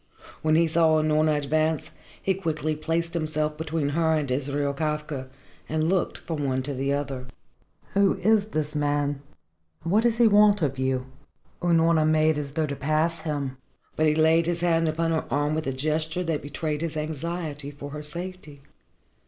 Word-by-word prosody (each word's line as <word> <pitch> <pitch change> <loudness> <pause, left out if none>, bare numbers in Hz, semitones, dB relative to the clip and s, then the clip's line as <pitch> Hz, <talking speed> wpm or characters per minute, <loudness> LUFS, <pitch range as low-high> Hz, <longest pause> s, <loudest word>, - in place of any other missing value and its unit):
When 155 0 +3
he 170 +1 +5
saw 160 -1 +3
Unorna 155 0 +2
advance, 155 +2 0 0.3
he 195 - +1
quickly 155 -4 -2
placed 165 +2 -2
himself 155 -2 -1
between 160 -1 -2
her 160 +2 +2
and 145 -4 -1
Israel 140 +2 -1
Kafka, 150 -2 -3 0.4
and 155 +1 +1
looked 185 -1 0
from 160 -3 -4
one 130 -1 0
to 140 +2 -3
the 135 +1 -1
other. 135 -3 -3 0.7
"Who 200 -1 +3
is 210 +2 +2
this 155 -5 -2
man?" 145 -1 +1
he 145 - -1
asked. 80 - -21
"And 165 - -2
what 215 - +5
does 230 -1 +2
he 240 - +5
want 205 -2 +5
of 135 -2 -1
you?" 130 -1 0 0.6
Unorna 165 -2 +3
made 155 -1 +3
as 140 -1 -5
though 160 0 +1
she 140 - -3
would 140 - -9
pass 155 +4 +1
him. 140 -4 -3 0.4
But 155 - +2
he 150 - +3
laid 160 +1 +4
his 170 -1 -1
hand 165 -2 +2
upon 165 +1 0
her 160 - 0
arm 145 +2 +1
with 155 -1 -2
a - - +1
gesture 155 +5 -1
that 165 -3 -1
betrayed 150 +1 -3
his 165 -2 -3
anxiety 155 -1 -4
for 145 0 -9
her 150 +1 -6
safety. 155 -2 -6
155 Hz, 185 wpm, -26 LUFS, 145-165 Hz, 0.7 s, he